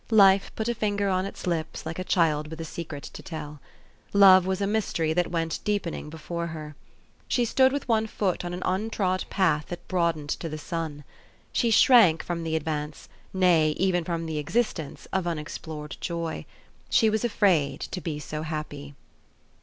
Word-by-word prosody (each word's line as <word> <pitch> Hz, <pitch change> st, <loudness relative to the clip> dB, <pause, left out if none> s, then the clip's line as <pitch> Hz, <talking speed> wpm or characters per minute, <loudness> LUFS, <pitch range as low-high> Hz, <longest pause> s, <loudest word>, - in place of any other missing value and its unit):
Life 195 Hz, -3 st, +5 dB
put 220 Hz, -, -2 dB
a 240 Hz, -, +1 dB
finger 205 Hz, -3 st, 0 dB
on 185 Hz, 0 st, 0 dB
its 200 Hz, -, -8 dB
lips 165 Hz, -3 st, -2 dB
like 160 Hz, +2 st, -5 dB
a -, -, -1 dB
child 155 Hz, -5 st, +2 dB
with 160 Hz, +1 st, -8 dB
a 165 Hz, -, -4 dB
secret 155 Hz, -3 st, -7 dB
to -, -, -9 dB
tell. 150 Hz, -3 st, -7 dB, 0.5 s
Love 190 Hz, -2 st, +7 dB
was 190 Hz, -1 st, 0 dB
a 200 Hz, -, +1 dB
mystery 195 Hz, -6 st, 0 dB
that 175 Hz, +1 st, +1 dB
went 165 Hz, -2 st, -1 dB
deepening 195 Hz, -7 st, -2 dB
before 170 Hz, +2 st, -5 dB
her. 155 Hz, -2 st, -7 dB, 0.5 s
She 245 Hz, -, +2 dB
stood 260 Hz, +3 st, +4 dB
with 285 Hz, -1 st, -3 dB
one 220 Hz, -2 st, +2 dB
foot 190 Hz, -5 st, -1 dB
on 175 Hz, -, -4 dB
an 180 Hz, +1 st, -5 dB
untrod 185 Hz, -1 st, 0 dB
path 155 Hz, -6 st, +1 dB
that 175 Hz, -, -8 dB
broadened 170 Hz, -5 st, 0 dB
to 165 Hz, -, -3 dB
the 155 Hz, -, -5 dB
sun. 155 Hz, -1 st, -5 dB, 0.5 s
She 235 Hz, -, +2 dB
shrank 220 Hz, -7 st, +6 dB
from 170 Hz, -1 st, -3 dB
the 160 Hz, -1 st, -2 dB
ad 160 Hz, -, -1 dB
vance, 150 Hz, -1 st, -4 dB, 0.2 s
nay, 170 Hz, -5 st, +3 dB
even 180 Hz, -2 st, +1 dB
from 165 Hz, 0 st, -3 dB
the 160 Hz, -2 st, -3 dB
existence, 165 Hz, -3 st, -2 dB
of 190 Hz, -2 st, 0 dB
unexplored 150 Hz, -1 st, -5 dB
joy. 170 Hz, -2 st, -3 dB, 0.4 s
She 220 Hz, -1 st, +4 dB
was 220 Hz, +1 st, 0 dB
afraid 180 Hz, -, +2 dB
to 180 Hz, -, -5 dB
be 160 Hz, -3 st, -3 dB
so 150 Hz, +1 st, -5 dB
happy. 150 Hz, -2 st, -6 dB
170 Hz, 180 wpm, -26 LUFS, 155-195 Hz, 0.5 s, Love